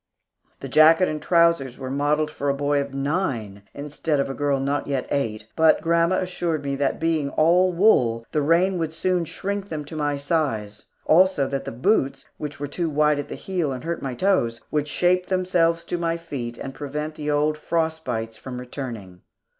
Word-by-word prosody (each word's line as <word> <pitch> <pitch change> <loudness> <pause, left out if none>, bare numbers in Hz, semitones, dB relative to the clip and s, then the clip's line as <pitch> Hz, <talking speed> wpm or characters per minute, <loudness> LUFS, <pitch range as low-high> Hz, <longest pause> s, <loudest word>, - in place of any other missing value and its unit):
The 135 - -5
jacket 160 +6 +6
and 155 -1 -3
trousers 170 -7 +2
were 130 -1 -6
modelled 150 +2 +1
for 145 -2 -2
a 140 - +1
boy 145 0 +1
of 140 0 -5
nine, 135 - -2
instead 150 +1 -2
of 140 - 0
a - - -4
girl 145 -1 0
not 140 +2 -1
yet 135 -2 -1
eight, 110 -7 -1
but 160 -1 +5
grandma 170 +2 +2
assured 175 -5 -2
me 140 0 -1
that 140 -1 0
being 160 -3 0
all 175 +5 +3
wool, 125 - +3
the 150 - +1
rain 175 +5 +2
would 160 -1 -2
soon 180 +1 0
shrink 200 +4 -4
them 150 -2 -4
to 155 - -9
my 145 -2 -1
size, 135 -9 -2 0.2
also 180 -3 +4
that 135 0 -3
the - - -4
boots, 135 - 0
which 150 -1 -6
were 145 - -2
too 165 +3 -2
wide 150 0 +2
in 145 - -4
the - - -6
heel 175 -7 -2
and 125 -2 -5
hurt 170 0 -3
my 130 -2 -4
toes, 120 -11 +1
would 150 -1 0
shape 180 +4 +1
themselves 175 -3 +1
to 175 - -3
my 165 0 0
feet 130 -8 -6
and 135 - -6
prevent 150 +2 -5
the 150 -1 -5
old 150 +1 +2
frost 160 +1 -1
bites 115 -3 -4
from 125 +1 -7
returning. 115 -8 -7
150 Hz, 195 wpm, -23 LUFS, 135-170 Hz, 0.2 s, jacket